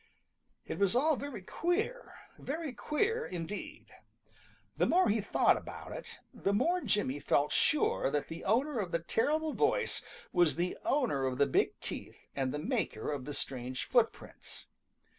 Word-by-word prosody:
It - - -5
was 200 +2 +3
all 305 +5 +4
very 275 -8 -6
queer, 420 - -1 0.2
very 305 -1 -4
queer 425 - 0
indeed. 180 +3 -6 0.8
The 175 +4 +2
more 370 +2 +4
he 215 +1 +2
thought 200 - +3
about - - -8
it, - - -7 0.2
the 200 +1 0
more 355 - +2
Jimmy 145 - 0
felt 145 0 +2
sure 295 - +2
that 145 0 -1
the 165 +1 -7
owner 250 +6 +2
of 185 -5 -2
the - - +2
terrible 295 - 0
voice - - +1 0.3
was 175 -3 +4
the 175 +2 -1
owner 220 - +1
of 130 -1 -2
the 140 - +5
big 140 - +1
teeth - - -6
and 135 -2 0
the 150 - -2
maker 150 -5 -1
of 140 -3 -4
the 145 - -5
strange 130 -1 -3
footprints. 240 -3 -1
205 Hz, 160 wpm, -32 LUFS, -, 0.8 s, the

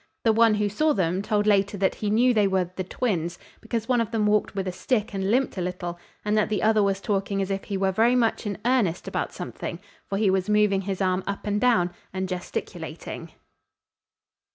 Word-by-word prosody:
The 225 - +4
one 225 -1 +5
who 210 0 +1
saw 300 +10 +2
them 185 -1 0
told 210 0 0
later 200 -1 +2
that 190 0 +2
he 210 - -3
knew 245 +4 +4
they 210 -3 +3
were 185 -2 0
"the 185 - -2
twins" 175 -4 -2 0.2
because 225 -1 -3
one 245 -2 +3
of 230 - -2
them 225 -2 0
walked 210 -1 +1
with 190 -1 -2
a - - -1
stick 215 +3 -1
and 195 0 -1
limped 250 -3 +1
a - - -1
little, 175 -1 -4 0.3
and 210 0 +1
that 215 - +2
the 215 - -1
other 220 -1 +4
was 195 -1 +1
talking 195 -1 -1
as 195 0 -1
if 195 0 -3
he 200 - -3
were 190 0 +1
very 230 +6 +3
much 230 -2 +1
in 200 - -3
earnest 230 -9 +1
about - - -2
something, 170 - -6 0.3
for 195 - -1
he 200 -2 +3
was 190 +1 0
moving 210 -2 +3
his 195 0 -3
arm 185 0 +1
up 200 0 -4
and 205 0 0
down 225 -8 +3 0.2
and 190 0 -2
gesticulating. 170 -2 -6
200 Hz, 220 wpm, -25 LUFS, 190-220 Hz, 0.3 s, one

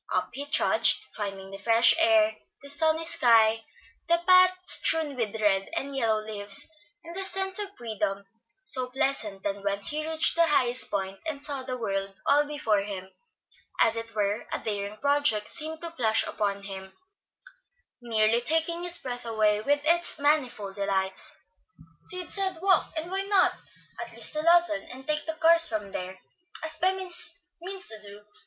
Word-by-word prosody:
Up - - -1
he 285 +2 -6
trudged, 290 - +3
finding 195 -2 -6
the 195 - -9
fresh 230 +3 +5
air, 330 -1 +3 0.3
the 280 - -9
sunny 320 +2 +1
sky, 225 -8 +3 0.4
the 340 0 +3
path 370 0 +6
strewn 315 -3 +3
with 220 -3 -3
red 195 -2 +1
and 275 0 -4
yellow 220 -4 0
leaves, 205 -2 -1 0.4
and 335 +1 -10
the 385 +2 -1
sense 385 0 +1
of 405 -1 -2
freedom 210 -4 -4 0.4
so 255 -4 +1
pleasant 250 -7 -2
that 200 0 -4
when 200 0 -1
he 305 +8 -4
reached 320 0 +4
the 335 0 +4
highest 255 -4 +2
point 195 -1 -4
and 305 -3 -4
saw 280 -1 -4
the 255 -1 -5
world 195 -3 -3
all 290 +1 +3
before 230 -8 0
him, 195 -2 -7 0.7
as 225 - +3
it 230 -1 -6
were, 205 0 -1
a - - -1
daring 205 -1 -5
project 280 -6 +1
seemed 315 +1 -5
to 335 -1 -6
flash 225 -8 +2
upon 200 -1 -3
him, 190 -1 -9 1.1
nearly 225 0 +1
taking 325 +5 0
his 350 0 +4
breath 245 -4 -5
away 215 -2 +1
with 290 +4 0
its 340 +1 +3
manifold 275 -9 0
delights. 190 -1 -2 0.7
"Sid 365 -2 -5
said, 380 -3 -1
'Walk,' 380 +1 +2
and 330 +3 -5
why 385 +1 -1
not? 390 -1 +2 0.5
at - - -6
least - - -1
to 305 - -1
Lawton, 340 -2 +3
and 260 +1 -11
take 300 0 -2
the 320 - -3
cars 335 +1 +6
from 210 -3 -4
there, 185 0 -6 0.5
as 315 0 -2
Bemis 370 -2 +1 0.2
means 375 +1 -4
to 220 -1 -8
do. 205 0 -8
255 Hz, 170 wpm, -27 LUFS, 210-325 Hz, 1.1 s, path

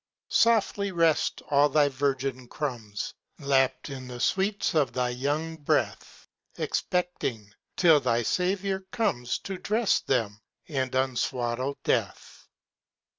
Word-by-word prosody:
Softly 210 -3 +3
rest 165 -3 +1
all 145 +1 +5
thy 150 -1 +4
virgin 135 -2 -2
crumbs! 120 -8 -4 0.2
Lapped 135 0 +1
in 130 -2 -7
the 125 -1 -7
sweets 195 - +1
of 150 -4 +2
thy 125 -1 0
young 145 +6 -2
breath, 145 - -2 0.3
Expecting 130 - -2 0.2
till 165 -4 +6
thy 120 -3 +1
Saviour 190 - 0
comes 125 - 0
To 190 -2 -6
dress 215 +3 +2
them, 110 -5 -1 0.3
and 130 -5 -2
unswaddle 130 0 -1
death. - - -2
140 Hz, 115 wpm, -27 LUFS, 125-175 Hz, 0.3 s, till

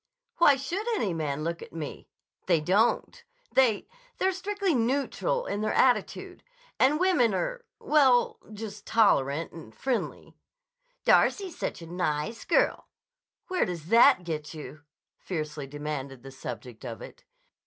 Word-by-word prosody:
Why 295 -5 +6
should 345 - -4
any 200 - -1
man 150 -2 -2
look 170 +1 -3
at - - -11
me? 160 -3 -7 0.4
They 170 -3 +4
don't. 215 - +1 0.3
They—they're 380 - +1
strictly 390 0 -1
neutral 280 - 0
in 205 - -3
their 215 0 0
attitude. 250 -2 +1 0.4
And 285 +4 +4
women 350 - +3
are—well—just 245 - 0
tolerant 165 -9 +2
and 135 -10 -12
friendly. 260 -3 -3 0.7
'Darcy's 385 -5 +3
such - - -3
a - - -8
nice 175 +4 -2
girl.' - - +2 0.6
Where 370 -1 +1
does 170 -2 -5
that 235 -3 +6
get 155 -2 -5
you?" 155 0 -9 0.4
fiercely 155 -5 -4
demanded 140 -3 -6
the 135 - -9
subject 125 -2 -8
of 115 -4 -7
it. - - -12
205 Hz, 125 wpm, -28 LUFS, -, 0.7 s, Why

